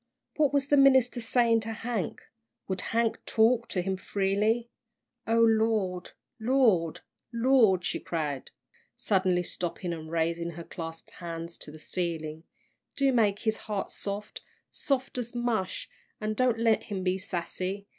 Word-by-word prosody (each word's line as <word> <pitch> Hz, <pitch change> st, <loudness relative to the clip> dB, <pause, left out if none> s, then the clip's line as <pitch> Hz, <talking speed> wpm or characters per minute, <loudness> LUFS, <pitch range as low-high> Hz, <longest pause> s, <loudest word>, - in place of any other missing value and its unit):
What 295 Hz, -3 st, +3 dB
was 280 Hz, -1 st, +1 dB
the 290 Hz, -, +5 dB
minister 260 Hz, -3 st, +5 dB
saying 230 Hz, 0 st, +3 dB
to 225 Hz, +1 st, -4 dB
Hank? 225 Hz, -4 st, -3 dB, 0.4 s
Would 190 Hz, -1 st, -2 dB
Hank 230 Hz, 0 st, 0 dB
talk 230 Hz, +1 st, +3 dB
to 180 Hz, -, -1 dB
him 190 Hz, 0 st, -1 dB
freely? 205 Hz, +5 st, 0 dB, 0.6 s
"O 225 Hz, +1 st, +2 dB
Lord! 220 Hz, -5 st, +2 dB, 0.3 s
Lord! 220 Hz, -, +2 dB, 0.3 s
Lord!" 230 Hz, -7 st, +4 dB
she -, -, -1 dB
cried, 150 Hz, -5 st, -3 dB, 0.5 s
suddenly 185 Hz, -3 st, +1 dB
stopping 175 Hz, 0 st, -3 dB
and 160 Hz, -1 st, -7 dB
raising 170 Hz, +1 st, 0 dB
her 170 Hz, +1 st, -7 dB
clasped 165 Hz, -1 st, -8 dB
hands 170 Hz, 0 st, -6 dB
to -, -, -9 dB
the 155 Hz, -, -11 dB
ceiling, 160 Hz, -1 st, -4 dB, 0.5 s
"do 275 Hz, -1 st, +3 dB
make 210 Hz, -4 st, +2 dB
his 220 Hz, -1 st, 0 dB
heart 205 Hz, -2 st, -2 dB
soft 205 Hz, +1 st, -4 dB, 0.3 s
soft 265 Hz, -2 st, -1 dB
as 240 Hz, 0 st, -5 dB
mush, 235 Hz, -6 st, -1 dB, 0.3 s
an' 215 Hz, 0 st, -1 dB
don't 245 Hz, +1 st, +2 dB
let 225 Hz, -1 st, +2 dB
him 195 Hz, -3 st, -4 dB
be 185 Hz, +1 st, +1 dB
sassy. 185 Hz, +2 st, -4 dB
205 Hz, 145 wpm, -28 LUFS, 175-235 Hz, 0.6 s, the